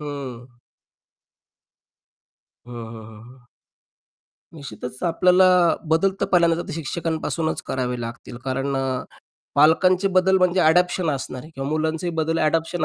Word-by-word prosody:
हं. 130 Hz, -5 st, -8 dB, 2.1 s
हं, -, -, -9 dB
हं, 115 Hz, -2 st, -8 dB
हं, 110 Hz, +4 st, -14 dB
हं. 125 Hz, -, -25 dB, 1.1 s
निश्चितच 140 Hz, -4 st, -9 dB
आपल्याला 180 Hz, +2 st, +4 dB, 0.5 s
बदल 190 Hz, +4 st, +3 dB
तर -, -, +2 dB
पहिल्यांदा 170 Hz, -1 st, +3 dB
तर -, -, -8 dB
शिक्षकांपासूनच 160 Hz, +1 st, -3 dB
करावे 125 Hz, -2 st, -2 dB
लागतील. 115 Hz, +1 st, -8 dB
कारण 135 Hz, +1 st, -2 dB
अ, 130 Hz, -1 st, -2 dB, 0.5 s
पालकांचे 180 Hz, +6 st, +4 dB
बदल 190 Hz, 0 st, +3 dB
म्हणजे 180 Hz, 0 st, +2 dB
अडॉप्शन 180 Hz, +1 st, +3 dB
असणार 130 Hz, -2 st, -4 dB
आहे 155 Hz, -, -13 dB
किंवा 135 Hz, +1 st, -4 dB
मुलांचेही 160 Hz, +2 st, -1 dB
बदल 160 Hz, 0 st, 0 dB
अडॉप्शन 165 Hz, +1 st, 0 dB
155 Hz, 120 wpm, -22 LUFS, 130-170 Hz, 2.1 s, आपल्याला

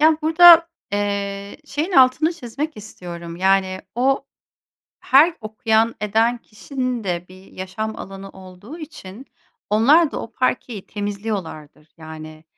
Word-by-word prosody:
Ya, 315 Hz, 0 st, +5 dB
burada, 335 Hz, +1 st, +8 dB, 0.2 s
eee, 200 Hz, -1 st, -3 dB
şeyin 315 Hz, +7 st, -3 dB
altını 270 Hz, +5 st, +4 dB
çizmek 290 Hz, 0 st, -6 dB
istiyorum. 170 Hz, -5 st, -9 dB
Yani, 190 Hz, 0 st, +1 dB
o, 270 Hz, +3 st, +1 dB, 0.7 s
her 310 Hz, +6 st, +5 dB
okuyan 220 Hz, +1 st, 0 dB
eden 225 Hz, +3 st, +1 dB
kişinin 250 Hz, +1 st, -5 dB
de 175 Hz, -1 st, -3 dB
bir 185 Hz, +1 st, -15 dB
yaşam 215 Hz, +4 st, -5 dB
alanı 195 Hz, 0 st, -9 dB
olduğu 190 Hz, -, -12 dB
için, 265 Hz, -, -11 dB, 0.4 s
onlar 280 Hz, +9 st, +4 dB
da -, -, -5 dB
o 230 Hz, -, -10 dB
parkeyi 245 Hz, -4 st, -2 dB
temizliyorlardır. 200 Hz, -8 st, -6 dB
Yani, 155 Hz, 0 st, -10 dB
215 Hz, 120 wpm, -21 LUFS, 190-270 Hz, 0.7 s, burada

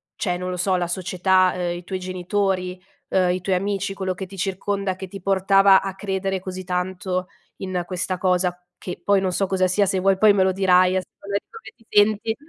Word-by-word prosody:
cioè 180 Hz, -2 st, -1 dB
non 180 Hz, 0 st, -4 dB
lo 180 Hz, -, -4 dB
so, 185 Hz, +1 st, +1 dB
la 175 Hz, -1 st, -1 dB
società, 185 Hz, +1 st, +2 dB
ehm, 175 Hz, -1 st, -2 dB
i 175 Hz, -, -10 dB
tuoi 185 Hz, +1 st, -4 dB
genitori, 185 Hz, 0 st, -2 dB, 0.3 s
uhm, 185 Hz, -1 st, +2 dB
i 180 Hz, 0 st, -2 dB
tuoi 185 Hz, 0 st, 0 dB
amici 195 Hz, +1 st, -2 dB
quello 190 Hz, -1 st, -2 dB
che 190 Hz, -, -5 dB
ti 195 Hz, +1 st, -12 dB
circonda 195 Hz, 0 st, -2 dB
che 190 Hz, 0 st, -7 dB
ti 195 Hz, +2 st, -9 dB
portava 195 Hz, +1 st, +5 dB
a 195 Hz, -1 st, -5 dB
credere 195 Hz, -1 st, -2 dB
così 185 Hz, 0 st, -6 dB
tanto 185 Hz, 0 st, -2 dB, 0.3 s
in 185 Hz, -2 st, -3 dB
questa 185 Hz, 0 st, -2 dB
cosa? 180 Hz, -1 st, +1 dB, 0.2 s
Che, 180 Hz, -, -7 dB
poi 200 Hz, -1 st, +3 dB
non 185 Hz, -1 st, 0 dB
so 195 Hz, +1 st, 0 dB
cosa 185 Hz, -1 st, +1 dB
sia, 200 Hz, +2 st, +2 dB
se 190 Hz, -, 0 dB
vuoi 195 Hz, 0 st, +3 dB
poi 210 Hz, 0 st, +6 dB
me 195 Hz, -2 st, +3 dB
lo 190 Hz, -, +2 dB
dirai 185 Hz, -1 st, +4 dB
as 185 Hz, -, -1 dB, 0.2 s
come 200 Hz, 0 st, -2 dB
come 455 Hz, 0 st, -12 dB
ti 230 Hz, -, -26 dB
senti 215 Hz, +2 st, +3 dB
190 Hz, 215 wpm, -22 LUFS, 180-195 Hz, 0.3 s, poi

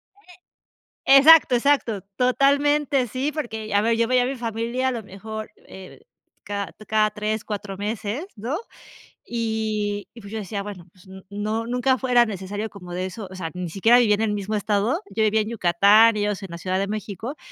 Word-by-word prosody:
Oye, 405 Hz, -3 st, -19 dB, 0.9 s
exacto, 305 Hz, -2 st, +7 dB
exacto 240 Hz, -6 st, +1 dB
totalmente 280 Hz, +1 st, +2 dB
sí, 265 Hz, +6 st, -2 dB
porque 220 Hz, -8 st, -5 dB
a 205 Hz, -, +5 dB
ver, 230 Hz, +1 st, +1 dB
yo 230 Hz, 0 st, +1 dB
veía 255 Hz, 0 st, +3 dB
a -, -, 0 dB
mi 270 Hz, +1 st, -3 dB
familia 235 Hz, +2 st, -2 dB
a -, -, +1 dB
lo 230 Hz, -2 st, -4 dB
mejor, 215 Hz, +3 st, -8 dB, 0.2 s
eh 190 Hz, -1 st, -12 dB, 0.4 s
cada 200 Hz, -1 st, -4 dB, 0.2 s
cada 215 Hz, -1 st, +3 dB
3, 215 Hz, 0 st, -3 dB
4 205 Hz, -2 st, -5 dB
meses, 215 Hz, -, -3 dB
¿no?, 240 Hz, +8 st, -3 dB, 0.7 s
y 215 Hz, -3 st, -2 dB
y, 235 Hz, -, -11 dB
pues, 200 Hz, +1 st, -11 dB
yo 220 Hz, -, -3 dB
decía 200 Hz, 0 st, -4 dB
bueno, 195 Hz, -4 st, -9 dB
pues 185 Hz, +2 st, -22 dB, 0.2 s
no, 215 Hz, +3 st, -3 dB
nunca 250 Hz, +1 st, +1 dB
fue 260 Hz, -1 st, -4 dB
era 240 Hz, -1 st, +6 dB
necesario 205 Hz, +1 st, -5 dB
como 180 Hz, -3 st, -10 dB
de 185 Hz, -, -2 dB
eso, 195 Hz, +1 st, -7 dB
o -, -, -10 dB
sea, 165 Hz, -3 st, -5 dB
ni 180 Hz, -1 st, -5 dB
siquiera 225 Hz, +8 st, +4 dB
vivía 220 Hz, -4 st, +4 dB
en 210 Hz, -, -1 dB
el 220 Hz, -2 st, 0 dB
mismo 205 Hz, +1 st, -3 dB
estado, 210 Hz, -, 0 dB
yo 220 Hz, -, -1 dB
vivía 215 Hz, 0 st, +3 dB
en 215 Hz, -, -6 dB
Yucatán, 210 Hz, +2 st, +5 dB
ellos 205 Hz, -1 st, -1 dB
en 195 Hz, -, -6 dB
la 170 Hz, -, -6 dB
Ciudad 185 Hz, +2 st, -2 dB
de 195 Hz, -, 0 dB
México, 215 Hz, -, -5 dB
215 Hz, 195 wpm, -23 LUFS, 200-240 Hz, 0.9 s, exacto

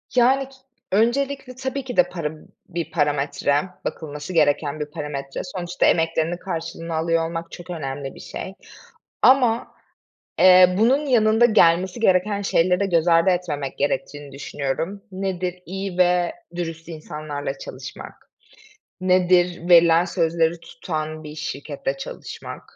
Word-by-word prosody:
Yani 265 Hz, +2 st, +4 dB
k -, -, -20 dB, 0.4 s
öncelikle 255 Hz, +5 st, 0 dB
tabii 265 Hz, +1 st, -4 dB
ki 255 Hz, 0 st, -7 dB
de 270 Hz, -, +5 dB
para, 160 Hz, -4 st, -3 dB
b -, -, -16 dB, 0.3 s
bir 170 Hz, -2 st, -4 dB
parametre, 145 Hz, -1 st, +1 dB, 0.2 s
bakılması 150 Hz, +2 st, -5 dB
gereken 150 Hz, -1 st, +2 dB
bir 150 Hz, -, -2 dB
parametre. 145 Hz, -3 st, -5 dB
Sonuçta 175 Hz, -2 st, -2 dB
emeklerinin 165 Hz, +1 st, +1 dB
karşılığını 165 Hz, -2 st, -5 dB
alıyor 165 Hz, 0 st, +1 dB
olmak 165 Hz, 0 st, -6 dB
çok 175 Hz, 0 st, -11 dB
önemli 140 Hz, -4 st, -5 dB
bir -, -, -12 dB
şey. 190 Hz, -, -7 dB, 0.7 s
Ama, 245 Hz, -3 st, +4 dB, 0.7 s
eee, 185 Hz, 0 st, +7 dB
bunun 260 Hz, +8 st, +3 dB
yanında 225 Hz, -2 st, +4 dB
gelmesi 185 Hz, -2 st, +3 dB
gereken 200 Hz, 0 st, +2 dB
şeyleri 185 Hz, 0 st, +2 dB
göz 170 Hz, -1 st, +2 dB
ardı 165 Hz, +2 st, +5 dB
etmemek 155 Hz, -7 st, -2 dB
gerektiğini 145 Hz, 0 st, -2 dB
düşünüyorum. 145 Hz, +7 st, -4 dB
Nedir? 185 Hz, -1 st, -3 dB
İyi 190 Hz, 0 st, -5 dB
ve 180 Hz, -1 st, +3 dB, 0.2 s
dürüst 165 Hz, -1 st, -5 dB
insanlarla 150 Hz, -3 st, -6 dB
çalışmak. -, -, -10 dB, 0.7 s
Nedir? 180 Hz, -1 st, +2 dB
Verilen 170 Hz, -1 st, +6 dB
sözleri 165 Hz, -2 st, 0 dB
tutan 155 Hz, -2 st, -5 dB
bir 150 Hz, 0 st, -8 dB
şirkette -, -, -4 dB
çalışmak. -, -, -8 dB
175 Hz, 125 wpm, -22 LUFS, 155-195 Hz, 0.7 s, eee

